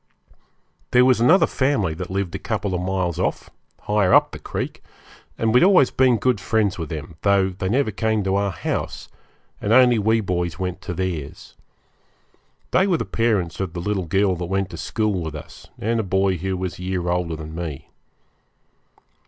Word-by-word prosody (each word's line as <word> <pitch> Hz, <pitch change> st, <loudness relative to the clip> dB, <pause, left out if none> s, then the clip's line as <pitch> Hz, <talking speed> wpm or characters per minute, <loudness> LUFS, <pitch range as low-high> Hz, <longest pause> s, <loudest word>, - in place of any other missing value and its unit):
There 125 Hz, 0 st, +5 dB
was 130 Hz, -3 st, +3 dB
another 160 Hz, +11 st, +6 dB
family 130 Hz, -, 0 dB
that 90 Hz, +3 st, -6 dB
lived 95 Hz, -2 st, -2 dB
a -, -, -4 dB
couple 100 Hz, -3 st, -2 dB
of 90 Hz, -, -1 dB
miles 90 Hz, -2 st, -1 dB
off, 95 Hz, -, -2 dB, 0.3 s
higher 105 Hz, -3 st, +3 dB
up -, -, +4 dB
the -, -, -8 dB
creek, -, -, -5 dB, 0.6 s
and 110 Hz, -1 st, +1 dB
we 125 Hz, -, +7 dB
had 180 Hz, -, +6 dB
always 185 Hz, -10 st, +5 dB
been 130 Hz, -2 st, +3 dB
good 125 Hz, 0 st, +1 dB
friends 105 Hz, -3 st, 0 dB
with 80 Hz, -3 st, -4 dB
them, 80 Hz, 0 st, -7 dB
though 100 Hz, -1 st, +3 dB
they 95 Hz, 0 st, -4 dB
never 125 Hz, 0 st, +1 dB
came 110 Hz, 0 st, 0 dB
to 95 Hz, 0 st, 0 dB
our 100 Hz, 0 st, +1 dB
house, 80 Hz, -, -4 dB, 0.5 s
and 105 Hz, -, -1 dB
only 125 Hz, -1 st, +6 dB
we 110 Hz, +2 st, +2 dB
boys 90 Hz, -4 st, -2 dB
went 95 Hz, 0 st, -4 dB
to 90 Hz, -, -5 dB
theirs. 85 Hz, -6 st, -5 dB, 1.2 s
They 190 Hz, -, +3 dB
were 180 Hz, -4 st, +2 dB
the -, -, -3 dB
parents 105 Hz, -8 st, 0 dB
of 95 Hz, -4 st, -3 dB
the 85 Hz, -, -5 dB
little 95 Hz, -1 st, -2 dB
girl 95 Hz, +2 st, +2 dB
that 90 Hz, -, -3 dB
went 95 Hz, +1 st, -2 dB
to 85 Hz, -, -7 dB
school 105 Hz, 0 st, -1 dB
with 80 Hz, -2 st, -5 dB
us, 80 Hz, 0 st, -11 dB
and 115 Hz, +2 st, -1 dB
a -, -, 0 dB
boy 95 Hz, -1 st, +1 dB
who 95 Hz, +2 st, -3 dB
was 90 Hz, -2 st, -4 dB
a -, -, -7 dB
year 90 Hz, -1 st, -2 dB
older 85 Hz, -2 st, -1 dB
than 80 Hz, 0 st, -8 dB
me. 80 Hz, -5 st, -6 dB
95 Hz, 195 wpm, -22 LUFS, 90-110 Hz, 1.2 s, we